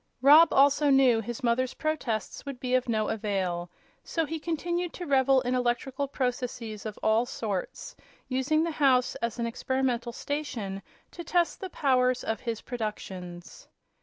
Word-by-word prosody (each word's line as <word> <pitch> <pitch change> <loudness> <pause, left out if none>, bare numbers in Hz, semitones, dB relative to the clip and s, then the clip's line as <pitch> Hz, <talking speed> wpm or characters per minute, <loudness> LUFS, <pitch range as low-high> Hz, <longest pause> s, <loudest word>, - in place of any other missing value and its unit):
Rob 305 +4 +8
also 285 +2 +4
knew 265 -4 +5
his 240 +3 -6
mother's 245 +2 +1
protests 275 -9 -3
would 275 -3 -7
be 255 -1 -3
of 255 -1 +2
no 215 -2 +1
avail; 190 -5 -2 0.3
so 325 -1 -1
he 320 +2 -4
continued 345 +2 -2
to 355 - -6
revel 270 -2 +4
in 250 0 -1
electrical 255 +2 -1
processes 245 -5 -3
of 210 - -7
all 225 +3 +3
sorts, 205 -7 -4 0.3
using 275 +5 +1
the 335 - -1
house 265 -5 +3
as 235 0 -3
an 235 - -1
experimental 245 0 -1
station 235 -9 -4 0.3
to 345 - -8
test 345 0 0
the 380 - -4
powers 255 -5 +2
of 225 -1 -2
his 230 -3 -4
productions. 190 -7 -6
255 Hz, 155 wpm, -28 LUFS, 225-280 Hz, 0.3 s, Rob